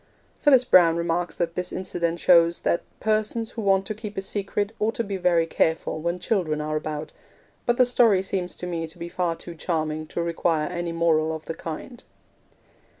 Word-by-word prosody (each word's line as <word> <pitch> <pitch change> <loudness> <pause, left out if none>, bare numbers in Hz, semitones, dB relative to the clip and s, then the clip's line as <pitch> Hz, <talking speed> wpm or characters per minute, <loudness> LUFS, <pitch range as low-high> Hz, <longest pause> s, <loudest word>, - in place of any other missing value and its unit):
Phyllis 265 -4 +5
Browne 170 -6 +6
remarks 170 0 -1
that 170 -1 -1
this 180 +1 -3
incident 170 -2 -2
shows 170 -1 +5
'that 170 - +1 0.2
persons 220 +1 0
who 230 - -5
want 195 -1 +2
to 215 - -3
keep 210 -1 -8
a - - 0
secret 205 +1 -2
ought 220 +2 0
to 235 - -1
be 200 -2 -4
very 175 -3 +2
careful 160 -1 0
when 170 +2 -1
children 175 -5 -1
are 155 0 -2
about'; 155 0 -4 0.5
but 240 0 +2
the 255 - +6
story 230 -6 +4
seems 185 -2 -3
to - - -6
me 165 -2 -3
to 160 - -14
be 170 0 -6
far 175 -2 -1
too 170 - -8
charming 155 -2 -2
to 170 - -3
require 165 -2 0
any 175 -1 -3
moral 160 -1 +2
of 160 - -9
the - - -4
kind. 165 +10 -7
175 Hz, 195 wpm, -25 LUFS, 165-200 Hz, 0.5 s, Browne